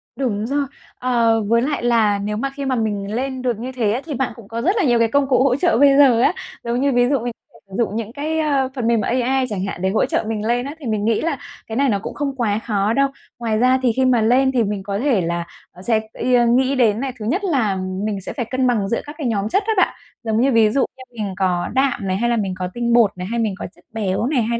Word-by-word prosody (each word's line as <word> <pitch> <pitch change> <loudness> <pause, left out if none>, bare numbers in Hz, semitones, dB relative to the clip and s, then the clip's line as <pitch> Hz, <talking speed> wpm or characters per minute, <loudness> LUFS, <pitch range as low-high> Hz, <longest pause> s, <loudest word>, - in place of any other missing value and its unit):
Đúng 225 -5 -1
rồi. 280 +3 0 0.3
Ờ, 235 -3 +2
với 230 +2 +3
lại 280 0 -1
là 225 -4 +3
nếu 210 +1 -3
mà 275 +5 -1
khi 280 -1 -4
mà 265 -1 0
mình 210 -3 -2
lên 260 +1 -3
được 245 -4 -1
như 250 +3 -5
thế 235 -5 0
á 240 +5 -1
thì 315 - -5
bạn 265 0 -2
cũng 230 -4 -13
có 230 +2 -4
rất 370 - +2
là 410 - +2
nhiều 240 -5 +3
cái 230 - +4
công 280 +4 +1
cụ 255 -1 +4
hỗ 265 -2 +3
trợ 340 -3 +2
bây 275 +1 +5
giờ 260 -5 +6
á. 295 - +4 0.3
Giống 240 +2 -1
như, 280 - +2
ví 245 -1 +3
dụ, 280 -1 +2
mình 240 +1 -4 0.4
sử 190 - -9
dụng 225 -3 0
những 225 0 -4
cái, 310 +3 -2
ờ, 280 -4 +1
phần 245 -4 -1
mềm 230 -2 +3
AI 255 +4 +1
chẳng 200 -3 -3
hạn 195 -2 -5
để 190 - +1
hỗ 215 - +2
trợ - - -1
mình 215 -1 -3
lên 245 +1 +1
á, 285 +2 -6
thì 295 - -10
mình 215 -3 -1
nghĩ 225 -1 +1
là 320 -4 -1 0.3
cái 220 - -5
này 275 +2 +2
nó 200 -3 +1
cũng - - -6
không 280 -2 -3
quá 220 -5 0
khó 210 -1 0
đâu. 275 +3 +3 0.3
Ngoài 225 -2 0
ra 255 +2 +4
thì 245 - +4
khi 260 - +2
mà 250 -3 +3
lên 255 +4 +3
thì 245 -3 +2
mình 205 -2 -3
có 200 0 -3
thể 250 -6 +2
là 170 0 -2 0.4
sẽ, 225 -2 +3
ơ, 245 -1 +2
nghĩ 260 +3 +3
đến 225 -4 +3
này, 265 0 -3
thứ 210 - -5
nhất 320 - 0
là 255 - +1 0.3
mình 205 -2 -2
sẽ - - -6
phải 240 - -3
cân 255 +2 0
bằng 215 -5 +1
giữa 235 - 0
các 295 +1 -9
cái 295 -6 -2
nhóm 210 -2 -1
chất 395 - +1
đó 445 - +2
bạn. 375 - +3 0.3
Giống 220 0 +1
như, 270 +2 +3
ví 225 -3 +5
dụ 265 +4 +1
như 260 - -10 0.2
mình 195 -2 -3
có 180 -3 0
đạm 265 -6 +1
này, 185 0 0
hay 235 +3 0
là 235 - +1
mình 195 -4 -1
có 180 - -1
tinh 235 0 0
bột 230 -4 +5
này, 180 0 -5
hay 235 +1 -1
mình 215 -4 0
có - - -6
chất - - -23
béo 205 -1 -1
này, 265 -1 +1
hay 235 +1 -1
235 Hz, 290 wpm, -20 LUFS, 215-265 Hz, 0.4 s, giờ